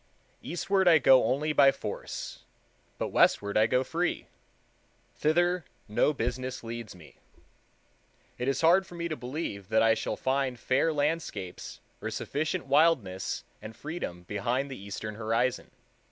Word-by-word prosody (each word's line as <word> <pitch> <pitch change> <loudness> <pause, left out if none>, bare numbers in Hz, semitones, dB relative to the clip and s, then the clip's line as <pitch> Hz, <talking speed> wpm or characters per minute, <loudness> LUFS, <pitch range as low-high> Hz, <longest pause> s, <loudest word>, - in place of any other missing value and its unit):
Eastward 190 +2 0
I 165 -2 +8
go 130 -2 +6
only 150 +4 0
by 140 -2 +6
force; - - -6 0.6
but - - -2
westward 100 0 +3
I 110 +1 +5
go 125 +2 +2
free. 170 +6 -2 0.9
Thither 175 +3 +1 0.2
no 105 +7 +2
business 130 -1 -3
leads 115 -2 -6
me. 85 -4 -16 1.2
It 125 - -2
is 135 -1 0
hard 175 +3 +5
for 175 - -11
me 170 0 -3
to 155 - -2
believe 125 - -5
that 110 0 +4
I 115 0 +5
shall - - -2
find 130 -2 -1
fair 135 +5 +2
landscapes 145 - -3 0.2
or - - -3
sufficient 145 -1 -2
wildness 135 - +2 0.2
and 110 +1 -9
freedom 150 - -6
behind 120 +9 -2
the 130 - -7
eastern 100 +2 -6
horizon. 115 +3 -1
130 Hz, 140 wpm, -29 LUFS, 110-155 Hz, 1.2 s, I